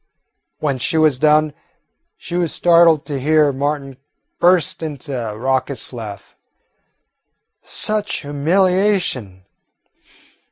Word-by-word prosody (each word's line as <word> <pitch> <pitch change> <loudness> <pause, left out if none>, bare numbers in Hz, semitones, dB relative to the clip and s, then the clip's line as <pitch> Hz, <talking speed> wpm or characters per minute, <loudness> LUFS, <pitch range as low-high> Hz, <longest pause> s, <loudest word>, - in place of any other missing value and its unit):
When 140 -4 -2
she 160 +6 -1
was 155 -5 +3
done, 155 0 +3 0.6
she - - -10
was 175 -3 0
startled 170 -3 +4
to 145 -3 -4
hear 150 +1 +3
Martin 140 -1 -3 0.4
burst 175 -3 +2
into 145 -2 -6
a 110 -4 -4
raucous 130 +1 -2
laugh. 110 -4 -9 1.3
Such 215 -1 -1
humiliation! 165 - 0
150 Hz, 95 wpm, -18 LUFS, 130-170 Hz, 1.3 s, startled